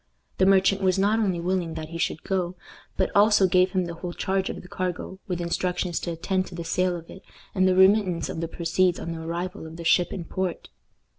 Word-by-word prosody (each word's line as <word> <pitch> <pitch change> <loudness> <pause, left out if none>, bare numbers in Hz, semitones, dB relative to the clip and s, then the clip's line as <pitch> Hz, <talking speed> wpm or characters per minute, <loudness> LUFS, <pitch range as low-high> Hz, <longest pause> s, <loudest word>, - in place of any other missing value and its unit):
The 190 - +5
merchant 195 0 +4
was 185 -1 +2
not 205 +3 +2
only 190 -6 0
willing 175 -2 -1
that 155 -1 -6
he 165 0 -6
should 160 - -1
go, 185 -2 -1 0.4
but - - +1
also 205 -1 +6
gave 185 0 +3
him 185 -2 +1
the 170 - -5
whole 175 +1 -6
charge 190 +1 -1
of - - -6
the - - -12
cargo, 185 +1 -4
with 180 -3 -2
instructions 175 0 -1
to 170 - -4
attend 185 +3 -1
to 175 - -10
the 170 - -5
sale 180 +2 0
of 165 -1 -8
it, 190 - -11 0.3
and 185 -1 +3
the 185 - +3
remittance 190 -3 +4
of 160 - -5
the 165 - -2
proceeds 170 +2 +1
on 170 - -5
the 165 -1 -5
arrival 170 +1 -4
of 160 - -10
the 170 - -7
ship 175 +1 +3
in 175 -4 -5
port. 185 -1 -3
180 Hz, 230 wpm, -25 LUFS, 170-190 Hz, 0.4 s, also